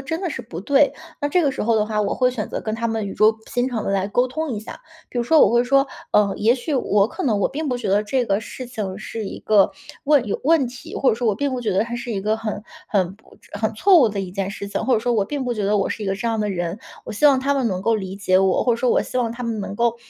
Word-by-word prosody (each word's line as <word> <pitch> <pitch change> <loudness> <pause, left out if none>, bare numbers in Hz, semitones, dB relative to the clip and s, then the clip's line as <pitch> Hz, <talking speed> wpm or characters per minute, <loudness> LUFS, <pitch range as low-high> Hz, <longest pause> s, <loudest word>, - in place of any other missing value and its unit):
真 320 +5 -3
的 360 - -1
是 - - -5
不 175 -8 -9
对， 280 +4 +3 0.3
那 290 - 0
这 355 +4 +2
个 285 -3 +1
时 - - -4
候 230 +1 +2
的 210 - +2
话， 215 0 -1
我 205 - 0
会 250 -1 +2
选 230 -5 -4
择 - - -4
跟 215 0 -2
他 230 +1 -2
们 225 -2 -2
语 195 - -5
重 215 +1 +4 0.2
心 245 +1 +1
长 235 -4 -3
地 - - -1
来 195 0 0
沟 245 +5 +2
通 310 +4 -3
一 210 - -4
下。 220 - -10 0.3
比 245 - -3
如 - - +2
说 320 +6 +4
我 - - +6
会 240 0 +4
说： 275 +2 +3 0.3
“呃， 205 -1 +4
也 225 +3 +4
许 270 +4 -3
我 205 -5 +2
可 370 - -6
能 220 -7 +1
我 200 - +2
并 300 +2 -4
不 250 - 0
觉 235 -4 -4
得 205 +2 +3
这 245 +4 0
个 200 -1 0
事 255 +3 -8
情 210 -6 -5
是 215 +1 -6
一 - - -6
个 210 -2 +4 0.3
问 285 -4 +3
有 200 - -2
问 310 -2 +4
题， 245 +1 -10
或 270 - +3
者 - - +1
说 235 0 -1
我 210 - +2
并 285 +6 -1
不 255 -1 -3
觉 220 - -1
得 195 +2 +2
它 235 +1 -6
是 240 0 -6
一 200 - -2
个 215 +2 +1
很 215 -1 -4 0.3
很 190 -3 0
不 220 - -22 0.2
很 215 +1 -1
错 365 - +5
误 245 - +5
的 205 -1 -5
一 190 -2 -5
件 195 0 -2
事 200 0 -6
情， 200 - -3
或 260 - +4
者 220 - +1
说 240 +1 0
我 215 - +2
并 285 -3 -3
不 245 - -1
觉 215 -3 -2
得 210 +1 +2
我 200 - 0
是 220 - -4
一 - - -3
个 195 - 0
这 195 +4 -4
样 225 -1 0
的 210 - 0
人。” 175 0 -3 0.3
我 - - -6
希 255 +8 +3
望 275 -2 +5
他 275 +2 +1
们 270 -3 0
能 185 -2 -3
够 230 +3 +2
理 190 -3 -4
解 185 -2 +2
我， 190 -1 +2
或 245 - +3
者 - - 0
说 250 +2 0
我 - - +3
希 255 - -3
望 235 -2 0
他 240 +1 -7
们 230 -3 -2
能 200 - -5
够， 235 +1 +1
225 Hz, 345 characters per minute, -22 LUFS, 205-255 Hz, 0.3 s, 我